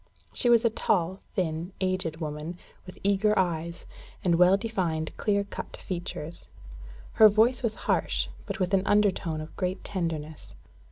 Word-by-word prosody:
She 245 - +2
was 235 0 +5
a 230 - +4
tall, 185 -3 0 0.2
thin, 170 0 -2
aged 185 -4 -1
woman, 155 +2 -5 0.3
with 185 - -10
eager 200 +2 +3
eyes, 170 -2 -1 0.4
and 175 - +3
well 180 +2 +6
defined 180 -8 -2
clear 200 -2 +1
cut 200 - -8
features. 170 -3 -6 0.6
Her 215 -1 +8
voice 225 +4 +3
was 225 -3 -1
harsh, - - +1 0.2
but - - -4
with 185 +1 0
an 195 - +5
undertone 190 -6 +2
of 155 - -10
great 185 0 -2
tenderness. 160 -5 -4
185 Hz, 150 wpm, -28 LUFS, 165-205 Hz, 0.6 s, Her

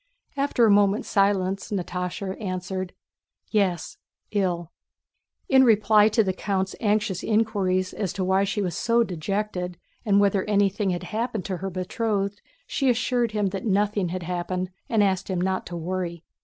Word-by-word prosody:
After 275 -4 +2
a 215 - +5
moment's 205 +1 +3
silence 195 -1 +1
Natásha 185 0 -3
answered: 185 -1 -4 0.6
"Yes, 190 -6 0 0.3
ill." 180 -4 -1 0.8
In 265 -1 +6
reply 215 -2 +5
to 220 +1 +3
the 190 -2 -1
count's 190 0 -2
anxious 210 -4 +1
inquiries 200 -4 +1
as 195 -5 -2
to 195 - -2
why 190 +1 +3
she 200 +1 -1
was 175 -3 -2
so 235 0 +2
dejected 180 -1 -3 0.3
and 200 -3 +3
whether 200 -1 +3
anything 200 -1 +1
had 175 -1 -2
happened 225 -3 -3
to 190 -2 -3
her 195 +2 -4
betrothed, 200 +2 -2 0.2
she 270 -2 0
assured 240 -1 +1
him 205 -2 +1
that 195 +3 -4
nothing 205 -2 +1
had 180 +1 -4
happened 180 +1 -3 0.2
and 220 -3 +3
asked 190 -1 0
him 185 -2 -1
not 190 +1 -1
to 175 - -5
worry. 170 0 -4
195 Hz, 155 wpm, -25 LUFS, 185-210 Hz, 0.8 s, In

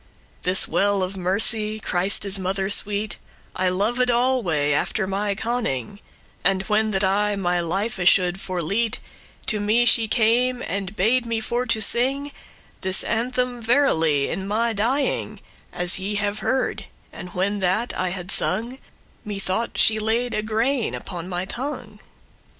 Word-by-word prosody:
"This 185 +1 +2
well* 200 -1 +1
of 185 +1 -4
mercy, 210 +4 +1
Christe's 195 +1 +2
mother 190 +1 -2
sweet, 205 +1 +2 0.4
*fountain 185 - -2
I - - +3
loved 230 +7 0
alway, 235 - +1
after 190 +7 0
my 200 +1 -2
conning:* 225 - -2
*knowledge 200 - -16 0.4
And 190 0 +3
when 215 +2 +1
that 195 -1 0
I 205 +2 +1
my 180 -2 0
life 195 +6 -2
should 180 0 +2
forlete,* 195 +5 -1
*leave - - -24
To 215 - 0
me 215 +4 +2
she 230 -2 +4
came, 245 +3 +2
and 195 +2 -4
bade 235 +5 +1
me 230 -1 -1
for 240 +3 -2
to 225 -1 +1
sing 270 +6 +3 0.5
This 190 0 +3
anthem 245 +1 -1
verily 165 - +2
in 190 0 -4
my 225 +3 0
dying, 250 +7 -1 0.3
As 180 +1 +1
ye 200 +2 -3
have 205 0 -1
heard; 260 0 -1 0.3
and, 180 0 -10
when 200 +3 -1
that 190 +6 0
I 185 - 0
had 180 +1 -4
sung, 240 +4 0 0.4
Me 210 -3 -5
thought 195 +4 -2
she 220 0 +3
laid 230 +3 -1
a 215 - -1
grain 225 +4 -1
upon 175 -1 -7
my 180 0 -2
tongue. 260 +9 -6
210 Hz, 155 wpm, -22 LUFS, 190-235 Hz, 0.5 s, she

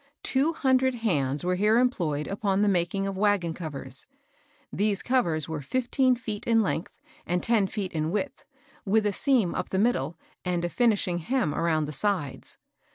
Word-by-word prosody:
Two 280 +5 +2
hundred 260 -3 +2
hands 150 - 0
were 180 +1 +1
here 210 +4 +3
employed 170 - +1
upon 200 0 0
the - - +3
making 190 +1 +1
of 195 -1 -3
wagon 200 -5 +2
covers. 140 -6 -7 0.7
These 205 -1 0
covers 170 - +1
were 160 -2 -4
fifteen 255 - +1
feet 220 -4 -6
in 225 -1 +4
length, 185 -2 -3 0.3
and 180 +1 0
ten 225 -4 +3
feet 195 -2 -4
in 155 -1 -1
width, 210 +10 -3 0.4
with 210 +2 +2
a 205 - +1
seam 240 -7 +2
up - - -3
the 190 - -1
middle, 175 - +1 0.3
and 175 -1 -1
a - - -1
finishing 205 -6 +1
hem 205 - 0
around 160 -2 +1
the 150 - -5
sides. 160 -3 -2
195 Hz, 170 wpm, -27 LUFS, 165-230 Hz, 0.7 s, in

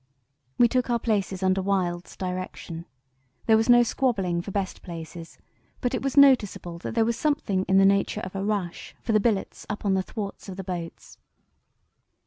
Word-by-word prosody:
"We 240 - +6
took 250 +1 0
our 240 - +3
places 200 -4 -1
under 190 0 +2
Wild's 180 -3 -1
direction. 180 -2 -5 0.6
There 220 - +5
was 225 +2 +2
no 240 0 +8
squabbling 200 -9 0
for 195 - -8
best 195 -1 -3
places, 165 -1 -9 0.4
but 245 -1 -1
it 255 - -1
was 275 +1 -2
noticeable 220 -11 +4
that 185 - -6
there 225 -1 +3
was 235 0 0
something 230 -12 0
in 190 - +3
the 195 - +6
nature 200 +2 +2
of 185 -1 -7
a 195 - -2
rush 200 -4 -3
for 230 - -1
the 215 - +4
billets 210 -2 -1
up 210 0 -5
on 195 - +3
the 190 - +2
thwarts 200 0 -6
of 185 - -7
the 195 - -5
boats. 175 -3 -7
195 Hz, 185 wpm, -26 LUFS, 185-225 Hz, 0.6 s, no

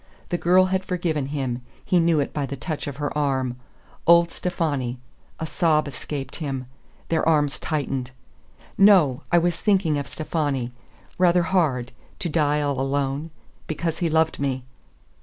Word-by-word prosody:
The 175 - 0
girl 185 +2 +5
had 190 0 +1
forgiven 170 -6 -1
him; 135 -4 -3 0.2
he 180 - +3
knew 165 -2 +3
it 140 - -1
by 145 -2 -2
the 140 - -4
touch 155 +2 -4
of 140 -1 -5
her 145 0 -3
arm.... 130 -4 0 0.5
Old 170 0 +6
Stefani! 145 -9 -2 0.4
A 160 - -2
sob 155 -2 +2
escaped 140 0 -6
him. 135 -4 -3 0.4
Their 165 - +1
arms 150 -2 +2
tightened. 135 -5 -2 0.7
"No; 185 -11 +6
I 175 - +5
was 175 0 +1
thinking 185 -8 +2
of 140 - -5
Stefani. 145 -6 -2 0.5
Rather 180 -1 +4
hard 150 -9 +1 0.3
to 175 - -3
die 150 -1 +2
all 140 -2 0
alone 140 +3 -1 0.4
because 160 +1 -2
he 170 - +1
loved 160 0 +2
me." 135 -2 -1
150 Hz, 155 wpm, -24 LUFS, 135-170 Hz, 0.7 s, Old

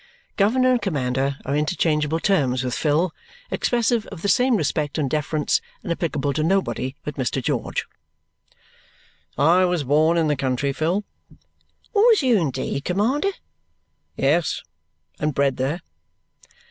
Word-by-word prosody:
Governor 255 +5 +3
and 245 -2 +2
commander 135 -6 -1
are 140 - -1
interchangeable 155 0 +1
terms 135 -10 +1
with 125 -1 -2
Phil, 155 +5 +1 0.4
expressive 235 -2 +1
of 180 -4 -10
the - - 0
same 250 +5 +4
respect 155 -4 -1
and 150 -3 0
deference 150 +2 0 0.2
and - - -4
applicable 150 -4 -1
to 155 - -1
nobody 135 - 0
but 150 - -6
Mr. 130 0 -1
George. 125 - -2 1.5
"I 170 +6 +4
was 175 -4 0
born 155 +5 +3
in 165 - +2
the 150 - +2
country, 135 +1 -1
Phil." 170 +8 0 0.9
"Was 435 - +5
you 250 -3 +4
indeed, 140 -5 -1
commander?" 230 - +1 0.9
"Yes. 155 +5 +1 0.6
And 150 -2 -1
bred 140 -2 +1
there." 145 +7 -1
155 Hz, 135 wpm, -23 LUFS, 140-195 Hz, 1.5 s, Was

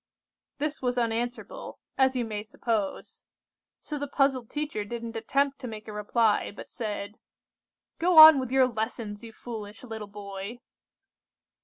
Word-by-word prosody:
"This 300 +1 -2
was 250 -1 -1
unanswerable, 240 +1 -3 0.2
as 265 -1 +3
you 245 -2 0
may 210 -2 -4
suppose; 215 -1 -3 0.6
so 300 -1 -5
the 285 - -3
puzzled 270 -4 +1
teacher 295 -8 -3
didn't 230 +2 -6
attempt 275 +5 0
to 255 - -6
make 215 -1 -8
a 215 - -7
reply, 210 +1 +1
but 205 - -11
said:— 210 -2 -5 0.8
"'Go 350 0 +3
on 315 -2 +12
with 255 -2 -4
your 265 -1 +5
lessons, 220 -2 -4
you 230 - -8
foolish 215 -2 -8
little 220 -3 -6
boy! 200 +2 -7
230 Hz, 145 wpm, -28 LUFS, 210-265 Hz, 0.8 s, on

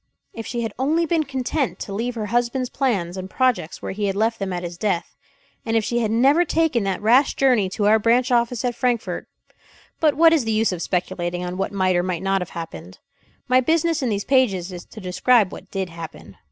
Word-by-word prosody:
If 225 - -7
she 240 -1 -3
had 225 - -4
only 315 +6 +2
been 325 -1 +1
content 270 +1 -2
to 200 - -5
leave 235 +4 -2
her 220 -2 -3
husband's 245 +1 0
plans 195 -10 -1
and 185 0 -6
projects 250 -8 0
where - - -3
he 205 +2 -2
had 195 -1 -1
left 225 +2 0
them 195 -1 -3
at 175 0 -3
his 175 0 -5
death, 180 -2 -2 0.5
and 225 0 0
if 225 - +1
she 240 +2 0
had 225 -2 0
never 270 +9 +4
taken 320 -8 +1
that 195 +1 -2
rash 250 +6 +4
journey 245 -8 +3
to 205 +2 -2
our 215 +2 +5
branch 240 +4 +2
office 235 0 +1
at 245 - 0
Frankfort 240 -1 -2 0.7
but 310 -2 +3
what 330 +1 +6
is 310 -6 +3
the 225 - -2
use 220 0 +2
of 180 -2 -4
speculating 175 -1 -2
on 180 0 -4
what 195 - -2
might 185 -2 +1
or 175 - +3
might 180 -1 -3
not 195 0 +1
have 180 - -5
happened? 90 - -8 0.5
My 255 0 +5
business 325 +3 +1
in 255 - 0
these 205 -2 -2
pages 200 -10 +2
is 175 -1 -8
to 220 - -12
describe 200 +3 +2
what - - -10
did 190 -2 -3
happen. 165 -1 -10
225 Hz, 225 wpm, -22 LUFS, 185-255 Hz, 0.7 s, what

